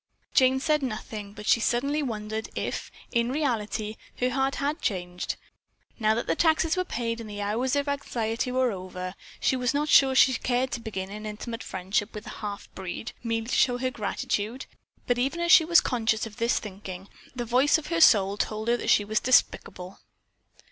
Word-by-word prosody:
Jane 260 0 +4
said 300 +1 +1
nothing, 215 -4 -5
but 210 0 -9
she 230 - +4
suddenly 280 +6 +1
wondered 220 -4 -4
if, - - -3 0.2
in 235 +1 +1
reality, 220 -6 -2 0.2
her 250 0 0
heart 270 +1 0
had 290 +3 -2
changed. 180 -4 -2 0.6
Now 215 -1 +3
that 235 - -2
the - - +1
taxes 320 0 +3
were 365 - +1
paid 230 -7 -3
and 220 - -8
the 205 0 -6
hours 225 +6 0
of 285 0 0
anxiety 240 -4 -2
were 255 -1 +2
over, 185 -1 -6 0.3
she - - +2
was 250 +2 0
not 300 +1 0
sure 270 -3 +6
that - - -4
she 260 0 +6
cared 250 +1 0
to 240 - -2
begin 195 -4 -5
an 215 +1 -6
intimate 225 +2 -6
friendship 195 +4 -2
with 210 - -7
a - - -7
"halfbreed," 200 -1 -6
merely 230 -1 -1
to 240 - -4
show 245 -2 +3
her 255 +1 -1
gratitude, 215 +2 -3 0.4
but 245 0 +1
even 275 +7 0
as 345 0 +1
she 325 - +8
was 340 +1 +6
conscious 225 -3 0
of 225 0 -10
this 235 0 +1
shrinking, 195 -2 -8 0.3
the 240 -1 -3
voice 255 +7 +4
of 315 - -7
her 335 - +1
soul 200 -8 +6
told 215 +2 -2
her 240 - +3
that - - -3
she 205 - +4
was 215 +1 +1
despicable. 190 -6 +1
235 Hz, 195 wpm, -27 LUFS, 210-260 Hz, 0.6 s, she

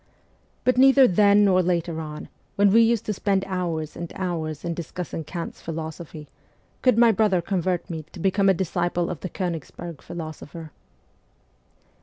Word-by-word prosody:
But 255 0 +2
neither 270 0 +7
then 205 +1 +5
nor 185 -2 +4
later 170 -2 -1
on, 150 -1 -7 0.3
when 200 -1 +4
we 230 +3 +6
used 230 -1 +2
to 210 - -1
spend 195 0 0
hours 170 -5 -3
and 170 -1 -6
hours 165 -4 -3
in 170 - -1
discussing 170 0 -5
Kant's 170 +2 -6
philosophy, 160 -1 -7 0.5
could 255 -3 +3
my 235 -1 +6
brother 205 -3 +2
convert 180 0 -1
me 165 -2 -5
to 185 - -11
become 195 +2 +2
a 190 - +4
disciple 175 -1 -1
of 160 - -6
the 185 - -5
Konigsberg 170 -2 -5
philosopher. 160 -1 -8
175 Hz, 155 wpm, -24 LUFS, 165-200 Hz, 0.5 s, neither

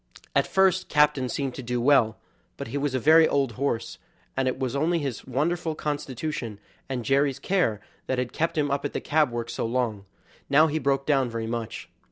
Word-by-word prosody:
At - - +3
first 190 -1 +2
Captain 150 -3 +3
seemed 135 -1 -2
to 135 - -7
do 125 0 -2
well, 120 -4 +4 0.4
but - - -6
he 140 - -3
was 140 -2 -1
a - - +1
very 160 +4 +6
old 140 -3 +1
horse, 125 -1 -2 0.4
and 130 0 0
it 130 - -1
was 130 -1 -2
only 165 +5 +1
his 140 -7 -4
wonderful 160 +5 -1
constitution, 145 -6 -4 0.3
and 125 -3 -3
Jerry's 135 +1 +2
care, 145 - 0 0.3
that 130 - 0
had 125 -1 -2
kept 165 +1 -1
him 145 -2 +1
up 140 0 -1
at 145 - -3
the - - -1
cab 150 -2 +2
work 120 -1 -4
so - - -3
long; 115 -4 -1 0.4
now 150 +3 +6
he 155 0 0
broke 135 -1 0
down 135 -4 +2
very 115 -1 -4
much. 115 -1 -4
135 Hz, 205 wpm, -26 LUFS, 120-150 Hz, 0.4 s, very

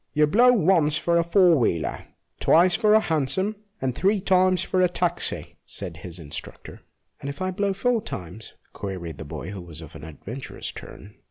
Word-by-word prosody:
" - - -49
You 150 0 +5
blow 240 +11 +5
once 165 -8 +3
for 170 +2 +1
a - - +3
four 170 -2 +4
wheeler, 85 -9 -1 0.3
twice 175 +2 +5
for 215 -2 +4
a - - +7
hansom, 180 +4 0 0.2
and 130 -1 -1
three 195 - +2
times 185 -1 +3
for 185 - 0
a 180 - +4
taxi," 175 0 -3
said 90 -5 -3
his 85 +1 -5
instructor. 75 -4 -8 0.2
" 85 +6 -38
And 140 - -4
if 140 - -7
I 185 0 -1
blow 200 +2 0
four 230 +4 +1
times? 90 - -8
" - - -39
queried 90 -5 -6
the 80 - -6
boy, 80 +5 -6
who 100 -3 -7
was 85 -3 -10
of 80 0 -11
an 80 - -10
adventurous 100 - -7
turn. 100 +2 -11
155 Hz, 200 wpm, -24 LUFS, -, 0.3 s, a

